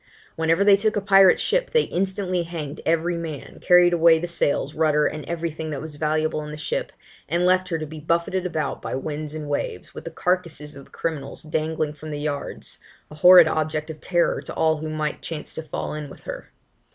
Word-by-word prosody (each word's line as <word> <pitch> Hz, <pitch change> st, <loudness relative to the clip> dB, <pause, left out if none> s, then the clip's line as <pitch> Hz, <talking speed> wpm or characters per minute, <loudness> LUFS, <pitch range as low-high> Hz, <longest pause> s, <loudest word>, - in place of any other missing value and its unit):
Whenever 165 Hz, +4 st, +2 dB
they 200 Hz, -1 st, +7 dB
took 215 Hz, +2 st, 0 dB
a -, -, +2 dB
pirate 195 Hz, -2 st, +6 dB
ship, -, -, +1 dB
they 470 Hz, -2 st, +3 dB
instantly 185 Hz, -1 st, -1 dB
hanged 160 Hz, -3 st, -6 dB
every 165 Hz, +1 st, +1 dB
man, 160 Hz, -4 st, -7 dB
carried 180 Hz, -1 st, +5 dB
away 165 Hz, -1 st, +6 dB
the 165 Hz, -, -3 dB
sails, 150 Hz, -4 st, -1 dB
rudder, 150 Hz, -1 st, +2 dB
and 155 Hz, -1 st, -2 dB
everything 165 Hz, -2 st, -4 dB
that 145 Hz, -3 st, -4 dB
was 155 Hz, 0 st, -8 dB
valuable 155 Hz, 0 st, 0 dB
in 150 Hz, -, -7 dB
the 150 Hz, -, -7 dB
ship, 150 Hz, -, -3 dB, 0.4 s
and 170 Hz, +3 st, +1 dB
left 185 Hz, 0 st, +3 dB
her 165 Hz, -, 0 dB
to 155 Hz, -, -4 dB
be 155 Hz, +1 st, -9 dB
buffeted 170 Hz, +4 st, 0 dB
about 155 Hz, -6 st, -3 dB
by -, -, -5 dB
the -, -, -1 dB
winds 150 Hz, +1 st, -5 dB
and 155 Hz, -, -5 dB
the -, -, -7 dB
waves, 145 Hz, -10 st, -3 dB
with -, -, -8 dB
the -, -, -4 dB
carcasses 165 Hz, -3 st, -2 dB
of 140 Hz, -1 st, -11 dB
the -, -, -24 dB
criminals 150 Hz, -5 st, -4 dB
dangling 155 Hz, -1 st, -2 dB
from 155 Hz, +1 st, -10 dB
the 150 Hz, -1 st, -4 dB
yards, 145 Hz, -1 st, -4 dB, 0.3 s
a -, -, -9 dB
horrid 180 Hz, -2 st, +9 dB
object 155 Hz, 0 st, -1 dB
of 155 Hz, -, -12 dB
terror 175 Hz, -2 st, +1 dB
to -, -, -7 dB
all 160 Hz, -1 st, +2 dB
who 155 Hz, +1 st, -5 dB
might 155 Hz, -1 st, -3 dB
chance 160 Hz, -2 st, -6 dB
to -, -, -5 dB
fall 155 Hz, -2 st, -5 dB
in 150 Hz, -1 st, -6 dB
with -, -, -13 dB
her. -, -, -8 dB
160 Hz, 220 wpm, -23 LUFS, 150-175 Hz, 0.4 s, horrid